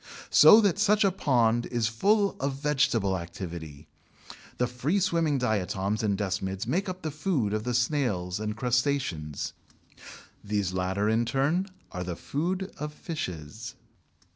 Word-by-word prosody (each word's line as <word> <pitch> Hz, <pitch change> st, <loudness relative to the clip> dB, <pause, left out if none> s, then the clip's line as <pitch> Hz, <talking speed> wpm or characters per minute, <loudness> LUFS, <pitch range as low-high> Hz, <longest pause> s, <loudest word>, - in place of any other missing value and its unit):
So 220 Hz, -, +9 dB
that 200 Hz, -3 st, +2 dB
such 210 Hz, 0 st, +4 dB
a 195 Hz, -, +4 dB
pond 120 Hz, -9 st, +2 dB
is 120 Hz, -2 st, 0 dB
full 200 Hz, -, +2 dB
of 140 Hz, +1 st, -1 dB
vegetable 135 Hz, -9 st, +1 dB
activity. 85 Hz, -3 st, -7 dB, 0.7 s
The 125 Hz, -, +2 dB
free 125 Hz, +10 st, -1 dB
swimming 165 Hz, -5 st, +1 dB
diatoms 105 Hz, -3 st, -1 dB
and 100 Hz, -3 st, 0 dB
desmids 95 Hz, 0 st, -2 dB
make 185 Hz, -, -1 dB
up 185 Hz, 0 st, -6 dB
the 155 Hz, -, -2 dB
food 145 Hz, -, -1 dB
of 110 Hz, +1 st, -2 dB
the 125 Hz, -1 st, -1 dB
snails 120 Hz, -9 st, 0 dB
and 105 Hz, 0 st, -3 dB
crustaceans. 125 Hz, -, -1 dB, 0.9 s
These 100 Hz, -3 st, -1 dB
latter 95 Hz, +3 st, 0 dB
in 115 Hz, +2 st, +2 dB
turn 140 Hz, +10 st, +1 dB, 0.2 s
are 90 Hz, -1 st, -4 dB
the 90 Hz, -1 st, -4 dB
food 180 Hz, -, -3 dB
of 150 Hz, 0 st, -5 dB
fishes. 100 Hz, -, -6 dB
120 Hz, 140 wpm, -27 LUFS, 95-150 Hz, 0.9 s, So